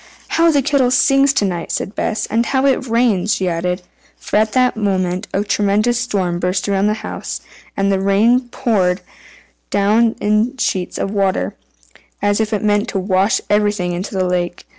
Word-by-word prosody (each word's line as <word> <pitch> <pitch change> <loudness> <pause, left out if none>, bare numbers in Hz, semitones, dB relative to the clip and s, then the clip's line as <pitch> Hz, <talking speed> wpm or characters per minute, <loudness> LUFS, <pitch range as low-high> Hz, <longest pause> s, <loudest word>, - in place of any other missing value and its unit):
"How 335 0 +3
the 285 -4 +2
kettle 275 -2 +2
sings 275 +2 +4
to 210 - +1
night!" 175 -3 -3
said 195 - -3
Bess, 220 - -2
"and 230 +1 0
how 265 0 +1
it 265 -1 +1
rains!" 225 -4 +2
she 190 - -2
added. 180 +1 -2 0.3
For - - -2
at 215 0 +1
that 255 -1 +2
moment 190 -2 -1
a 200 - 0
tremendous 210 +3 +1
storm 190 -8 -1
burst 180 +3 -1
around 200 0 +1
the 210 - +1
house, - - -5 0.4
and 200 0 +1
the 195 - +1
rain 230 +6 +2
poured 200 -9 0 0.7
down 215 +3 +2
in 215 +5 +1
sheets 185 -6 -2
of 195 - -2
water, 195 -2 0 0.7
as 205 0 +1
if 220 0 -2
it 210 -1 -1
meant 205 0 +1
to 195 - -2
wash 190 +1 +1
everything 205 -3 +1
into 185 +3 -5
the 185 -1 +1
lake. 180 -1 -2
205 Hz, 180 wpm, -18 LUFS, 190-235 Hz, 0.7 s, sings